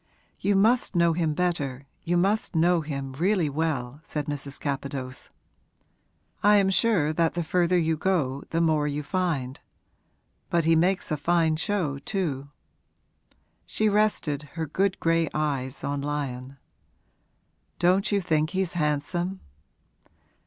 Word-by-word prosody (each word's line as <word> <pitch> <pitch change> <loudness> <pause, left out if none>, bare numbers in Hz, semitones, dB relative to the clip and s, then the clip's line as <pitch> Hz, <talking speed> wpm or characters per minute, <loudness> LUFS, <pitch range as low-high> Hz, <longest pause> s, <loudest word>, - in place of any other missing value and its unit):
'You 200 0 +1
must 220 +2 +3
know 170 -1 +4
him 160 -2 0
better 145 -7 -1 0.2
you 175 +1 0
must 200 +2 +1
know 170 +1 +3
him 140 -3 -5
really 175 +1 +1
well,' 145 -4 -2
said 150 -2 -4
Mrs. 140 -1 -4
Capadose. 135 -2 -4 1.1
'I 210 +1 +6
am 195 -1 +3
sure 190 -8 +3
that 165 +1 +1
the 175 - -1
further 180 +2 +2
you 160 -1 +1
go 150 -7 0
the 165 - 0
more 155 -3 +2
you 145 +1 -3
find. 145 -6 -2 0.9
But 170 -1 +2
he 165 0 +4
makes 180 +3 +1
a 155 - +1
fine 160 +1 +2
show, 160 -4 -1
too.' 140 -5 -3 1.2
She 215 0 +1
rested 170 -9 0
her 160 - -1
good 190 +5 0
gray 165 -1 +2
eyes 140 -4 -2
on 140 0 -2
Lyon. 140 -2 -4 1.2
'Don't 185 +4 +2
you 200 -1 +2
think 155 -3 +1
he's 190 -1 -1
handsome?' 175 +4 -1
160 Hz, 135 wpm, -26 LUFS, 145-180 Hz, 1.2 s, I